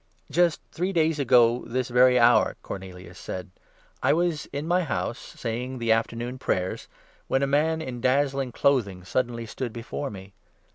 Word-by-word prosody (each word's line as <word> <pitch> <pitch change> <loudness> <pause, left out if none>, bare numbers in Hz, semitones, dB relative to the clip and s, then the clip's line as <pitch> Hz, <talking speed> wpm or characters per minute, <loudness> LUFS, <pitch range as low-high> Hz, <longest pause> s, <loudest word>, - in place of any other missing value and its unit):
"Just 175 -2 +2
three 180 +3 -1
days 160 -3 +1
ago 125 -3 +4
this 125 +2 -2
very 125 +1 +5
hour," 120 0 +4
Cornelius 90 -1 -8
said, 95 0 -6 0.5
"I - - 0
30 - - +1
was 170 -3 0
in 145 +3 -5
my 180 +2 +3
house, 130 -5 -2
saying 125 +3 -5
the 115 -2 0
Afternoon 115 +3 -1
Prayers, 90 -6 -2 0.4
when 135 - +1
a - - +4
man 160 +3 +1
in 125 -4 -6
dazzling 135 0 +1
clothing 110 -9 +1
suddenly 120 +4 -2
stood 120 +2 -5
before 120 +5 -5
me. 95 -1 -10
125 Hz, 160 wpm, -26 LUFS, 115-140 Hz, 0.5 s, very